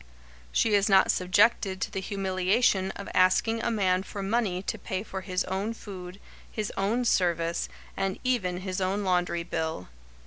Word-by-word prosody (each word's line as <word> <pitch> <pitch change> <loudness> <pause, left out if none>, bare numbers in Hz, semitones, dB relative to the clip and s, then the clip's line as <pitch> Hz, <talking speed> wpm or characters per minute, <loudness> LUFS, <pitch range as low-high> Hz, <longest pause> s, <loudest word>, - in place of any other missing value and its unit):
She 225 - +2
is 200 0 +3
not 190 -1 +6
subjected 190 +1 +2
to - - -2
the 190 - -3
humiliation 190 +1 +1
of 200 - -7
asking 225 +5 +3
a - - 0
man 190 -5 +2
for 200 +1 -6
money 195 -3 0
to - - -3
pay 190 +1 -3
for 190 -3 -6
his 185 0 -1
own 195 +4 -3
food, 185 -3 -9 0.3
his 215 -2 -3
own 220 +6 0
service, 170 -5 +1 0.3
and 195 -1 -1
even 190 -9 0
his 185 0 -3
own 195 +2 0
laundry 180 -2 +1
bill. 160 - -3
190 Hz, 165 wpm, -28 LUFS, 185-205 Hz, 0.3 s, not